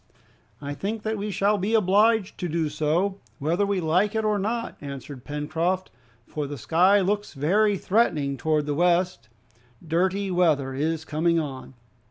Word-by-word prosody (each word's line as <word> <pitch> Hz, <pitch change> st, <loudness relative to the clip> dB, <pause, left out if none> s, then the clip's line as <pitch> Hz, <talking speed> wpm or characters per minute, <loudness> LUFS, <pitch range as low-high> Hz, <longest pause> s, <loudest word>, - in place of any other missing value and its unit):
"I 145 Hz, 0 st, -4 dB
think 205 Hz, +9 st, -4 dB
that 220 Hz, 0 st, -1 dB
we 210 Hz, +1 st, -3 dB
shall 205 Hz, +2 st, +1 dB
be 210 Hz, +5 st, 0 dB
obliged 210 Hz, +1 st, +3 dB
to 175 Hz, -, -2 dB
do 160 Hz, -1 st, 0 dB
so, 160 Hz, +7 st, 0 dB, 0.2 s
whether 170 Hz, +7 st, 0 dB
we 200 Hz, -2 st, 0 dB
like 180 Hz, +6 st, +1 dB
it 220 Hz, 0 st, 0 dB
or 210 Hz, -1 st, +1 dB
not," 230 Hz, +4 st, -2 dB
answered 140 Hz, -2 st, -8 dB
Pencroft, 160 Hz, +6 st, -2 dB, 0.3 s
"for 150 Hz, -2 st, -4 dB
the 145 Hz, 0 st, -6 dB
sky 185 Hz, -, +3 dB
looks 205 Hz, 0 st, -1 dB
very 200 Hz, +9 st, +2 dB
threatening 160 Hz, -10 st, +1 dB
towards 155 Hz, +2 st, 0 dB
the 145 Hz, -, -1 dB
west. 175 Hz, -6 st, +1 dB, 0.6 s
Dirty 190 Hz, +4 st, 0 dB
weather 155 Hz, -7 st, +2 dB
is 155 Hz, +3 st, -2 dB
coming 165 Hz, +2 st, +1 dB
on!" 135 Hz, -3 st, -6 dB
175 Hz, 160 wpm, -25 LUFS, 150-200 Hz, 0.6 s, obliged